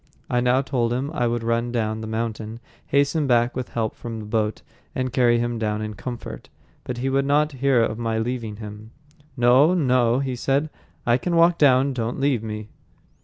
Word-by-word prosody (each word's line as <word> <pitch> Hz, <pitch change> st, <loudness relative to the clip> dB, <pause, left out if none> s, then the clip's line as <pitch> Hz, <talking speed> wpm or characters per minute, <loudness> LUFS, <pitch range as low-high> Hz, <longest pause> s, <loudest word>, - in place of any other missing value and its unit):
I 125 Hz, -, +2 dB
now 125 Hz, +2 st, +2 dB
told 125 Hz, -4 st, 0 dB
him 130 Hz, +4 st, -2 dB
I 120 Hz, -5 st, 0 dB
would 120 Hz, 0 st, -1 dB
run 115 Hz, +1 st, 0 dB
down 110 Hz, -2 st, -1 dB
the 110 Hz, -, -5 dB
mountain, 110 Hz, 0 st, -4 dB, 0.3 s
hasten 145 Hz, +1 st, +2 dB
back 120 Hz, -1 st, +2 dB
with 130 Hz, -1 st, -4 dB
help 110 Hz, -2 st, -2 dB
from 115 Hz, -1 st, -6 dB
the 110 Hz, -, -7 dB
boat, 105 Hz, 0 st, -1 dB, 0.3 s
and 130 Hz, -1 st, -2 dB
carry 120 Hz, -2 st, +4 dB
him 120 Hz, 0 st, -1 dB
down 105 Hz, -1 st, -1 dB
in 110 Hz, 0 st, -4 dB
comfort. 120 Hz, +2 st, -7 dB, 0.3 s
But 125 Hz, -, -5 dB
he 125 Hz, +2 st, -2 dB
would 135 Hz, +1 st, +2 dB
not 150 Hz, +2 st, +2 dB
hear 135 Hz, -3 st, +2 dB
of 110 Hz, 0 st, -2 dB
my 115 Hz, -1 st, -1 dB
leaving 115 Hz, -2 st, -3 dB
him. 105 Hz, 0 st, -9 dB, 0.5 s
"No, 130 Hz, +8 st, +5 dB
no," 125 Hz, -6 st, +3 dB
he 135 Hz, -2 st, -2 dB
said, 140 Hz, +5 st, 0 dB, 0.3 s
"I 120 Hz, +1 st, +3 dB
can 175 Hz, +4 st, -1 dB
walk 170 Hz, +1 st, +4 dB
down. 135 Hz, -1 st, +4 dB
Don't 120 Hz, 0 st, -3 dB
leave 135 Hz, -4 st, +1 dB
me." 110 Hz, -1 st, -6 dB
120 Hz, 195 wpm, -23 LUFS, 115-135 Hz, 0.5 s, No